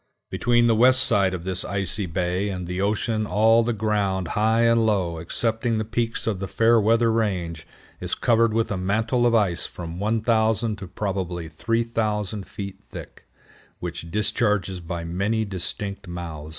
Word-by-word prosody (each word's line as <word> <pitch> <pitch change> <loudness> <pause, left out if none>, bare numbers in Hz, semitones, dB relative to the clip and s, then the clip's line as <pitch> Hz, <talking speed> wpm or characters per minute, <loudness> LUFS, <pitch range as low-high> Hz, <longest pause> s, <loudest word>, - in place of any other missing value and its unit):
Between 120 0 +2
the 115 - +4
west 130 +3 +5
side 100 -6 +3
of 90 -2 -5
this 95 0 -1
icy 100 0 -1
bay 90 +3 -1
and 90 -2 -4
the 90 +2 -3
ocean 110 +1 0
all 110 +4 +4
the 120 +1 0
ground, 100 -5 -1
high 110 +2 +2
and 115 0 +4
low, 95 -7 0
excepting 115 +7 -1
the 110 - -1
peaks 115 +1 -2
of 105 -4 -1
the 95 - -4
Fairweather 115 +1 +3
Range, 90 -8 -2 0.3
is - - -1
covered 115 -1 +3
with 115 0 0
a 100 - -1
mantle 110 +6 +1
of 115 - +2
ice 100 -6 +2
from 85 0 -8
1000 110 +1 +1
to 95 - -7
probably 90 -3 -3
3000 110 +1 -2
feet 100 -2 -7
thick, - - -11 0.5
which 85 - -6
discharges 105 -1 0
by 85 0 -5
many 100 +6 -1
distinct 100 +1 -4
mouths. 85 -3 -7
105 Hz, 160 wpm, -24 LUFS, 90-115 Hz, 0.5 s, west